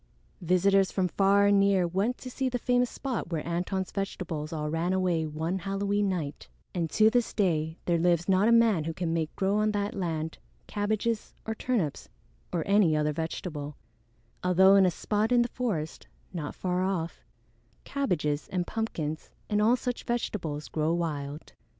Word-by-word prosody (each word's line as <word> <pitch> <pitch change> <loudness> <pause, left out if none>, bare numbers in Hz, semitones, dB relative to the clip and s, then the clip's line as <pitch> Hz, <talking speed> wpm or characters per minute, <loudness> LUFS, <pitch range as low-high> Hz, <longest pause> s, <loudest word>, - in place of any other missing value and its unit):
Visitors 190 +2 +3
from 185 -2 +1
far 200 +2 +3
and 200 0 +5
near 195 -2 +3
went 200 +8 0
to - - -10
see 265 +1 -1
the 250 - -1
famous 245 0 +2
spot 260 - -4
where 160 -2 -2
Antone's 180 +2 -2
vegetables 175 -6 -4
all 150 -2 -3
ran 165 +4 0
away 180 -4 +1
one 160 +5 -2
Halloween 200 +2 0
night; 155 -6 -4 0.3
and 170 -3 -1
to 215 +5 +4
this 245 -1 +1
day 160 -5 +1
there 170 -1 +2
lives 175 0 +2
not 195 +2 +4
a - - +5
man 225 -9 +4
who 165 0 -3
can 170 -3 -1
make 160 -1 -2
grow 195 +1 +1
on 215 0 +2
that 205 0 -1
land 160 -4 -3 0.3
cabbages 215 +2 -2
or 220 - -2
turnips 180 - -2 0.4
or 165 - -1
any 200 -6 +4
other 150 0 +1
vegetable, 150 -2 -4 0.7
although 185 +2 +6
in 195 -1 +6
a - - +4
spot 210 +5 -1
in 240 -1 +5
the 240 - -3
forest, 195 -13 -3 0.3
not 155 -5 -4
far 180 -1 -1
off, 185 -3 -2 0.6
cabbages 155 - -1
and 180 -2 -2
pumpkins 160 -9 -3 0.2
and 210 0 +3
all 225 +4 +5
such 250 -1 -4
vegetables 170 -11 -2
grow 155 0 0
wild. 150 -3 -4
185 Hz, 170 wpm, -28 LUFS, 160-210 Hz, 0.7 s, although